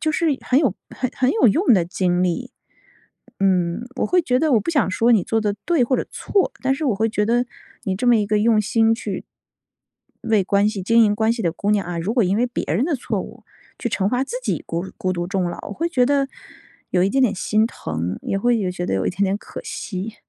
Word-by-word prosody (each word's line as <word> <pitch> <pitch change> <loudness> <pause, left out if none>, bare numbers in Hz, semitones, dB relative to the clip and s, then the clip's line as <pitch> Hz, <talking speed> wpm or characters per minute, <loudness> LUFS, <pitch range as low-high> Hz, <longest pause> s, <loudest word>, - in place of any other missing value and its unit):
就 310 - +1
是 335 +1 0 0.2
很 260 - +3
有 265 - +2 0.2
很 255 -2 -3
很 255 0 +2
有 440 - +3
用 245 - +4
的 185 -5 +4
经 180 0 0
历。 250 +9 -2 0.9
嗯， 185 +3 +1
我 - - 0
会 360 -1 +3
觉 250 -4 +1
得 315 +2 +1
我 235 - +5
不 335 - -3
想 270 - +1
说 230 +6 +3
你 205 -5 +4
做 225 - 0
得 205 -1 0
对 325 -7 +3
或 260 - 0
者 - - -2
错， 395 -2 0
但 265 0 +2
是 300 +1 -3
我 235 - +2
会 220 +3 +1
觉 210 -1 0
得 240 +2 +2 0.4
你 190 -5 -1
这 220 +7 -2
么 240 -1 +6
一 210 - +1
个 210 +1 +1
用 220 +1 +3
心 225 +1 +3
去 225 - -5 1.1
为 215 -3 +4
关 200 +2 +2
系 210 -3 -4
经 230 +4 +5
营 205 -1 +2
关 220 +1 +2
系 230 -1 -4
的 170 -4 0
姑 200 +4 -2
娘 205 -3 +1
啊， 175 -1 -4
如 195 +7 -2
果 245 - +4
因 190 +3 +1
为 245 - +2
别 240 - -4
人 250 - +1
的 325 0 0
错 240 - -3
误， - - -10 0.3
去 240 - -2
惩 195 -2 0
罚 250 +4 0
自 485 - -5
己 - - -2
孤 170 +3 -3
孤 185 0 -1
独 175 -1 -3
终 190 0 -1
老， - - -7
我 - - -6
会 335 +9 -2
觉 255 -7 +2
得， 280 0 +1 0.6
有 180 - +2
一 195 - +2
点 270 - +1
点 220 -5 +2
心 215 +3 +1
疼， 85 - -4
也 195 - -1
会 240 +3 +2
有 190 -4 -1
觉 180 0 -4
得 - - -1
有 95 - 0
一 - - +1
点 195 +3 -3
点 195 +1 +2
可 - - -9
惜。 220 - -5
220 Hz, 270 characters per minute, -21 LUFS, 190-250 Hz, 1.1 s, 么